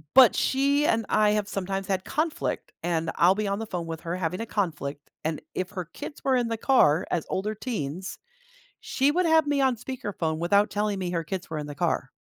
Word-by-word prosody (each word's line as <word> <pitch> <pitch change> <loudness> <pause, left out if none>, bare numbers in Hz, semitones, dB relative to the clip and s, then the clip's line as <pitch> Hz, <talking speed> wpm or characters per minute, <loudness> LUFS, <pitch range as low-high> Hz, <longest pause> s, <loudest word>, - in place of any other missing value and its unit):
but 260 -3 +8
she 280 +2 +2
and 225 0 +2
I 215 -1 +4
have 210 -1 0
sometimes 195 -1 -3
had 190 -1 -1
conflict, 310 +2 -2
and 165 -2 0
I'll 180 +3 +5
be 210 -1 -1
on 200 +2 -1
the 225 - -4
phone 175 -4 -3
with 165 -1 -5
her 170 +1 -3
having 180 +3 -2
a - - -3
conflict, 150 -7 -3
and 155 0 -1 0.2
if 185 0 -2
her 180 -4 -4
kids 235 - -9
were 265 -1 +3
in 240 -2 +1
the 225 - -1
car 185 - +4
as 170 - 0
older 210 +3 -1
teens, 190 - -4 0.6
she 275 +2 +1
would 350 +2 +2
have 320 -2 +4
me 290 -1 +1
on 260 -2 +3
speakerphone 205 -10 -3
without 200 +5 +3
telling 205 -1 -1
me 180 -2 -2
her 165 -2 -1
kids 185 +2 -5
were 155 - -3
in 150 - -4
the 145 - -6
car. - - -1
195 Hz, 220 wpm, -26 LUFS, 170-240 Hz, 0.6 s, but